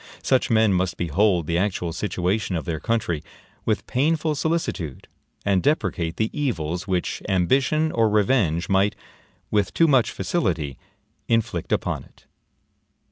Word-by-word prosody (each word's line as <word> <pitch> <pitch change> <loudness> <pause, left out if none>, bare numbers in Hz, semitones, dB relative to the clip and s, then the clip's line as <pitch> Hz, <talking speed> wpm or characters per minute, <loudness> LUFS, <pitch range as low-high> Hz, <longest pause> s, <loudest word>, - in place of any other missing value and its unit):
Such 130 -1 +2
men 110 -3 +4
must 90 -1 0
behold 90 +1 +2
the 85 +2 0
actual 90 -4 -1
situation 95 +1 -1
of 80 - -3
their 80 -3 -2
country 110 -9 -1 0.4
with - - 0
painful 155 +4 +1
solicitude, 145 - -2 0.4
and 95 -2 +3
deprecate 95 - 0
the 110 0 0
evils 90 - -2
which 90 -2 -1
ambition 135 - +2
or 115 -1 +2
revenge 100 -6 +2
might, 100 +1 +2 0.6
with 105 -3 +1
too 165 - +5
much 130 -6 +4
facility, 80 - -2 0.5
inflict 115 -7 0
upon - - -1
it. - - -24
100 Hz, 135 wpm, -23 LUFS, 85-125 Hz, 0.6 s, too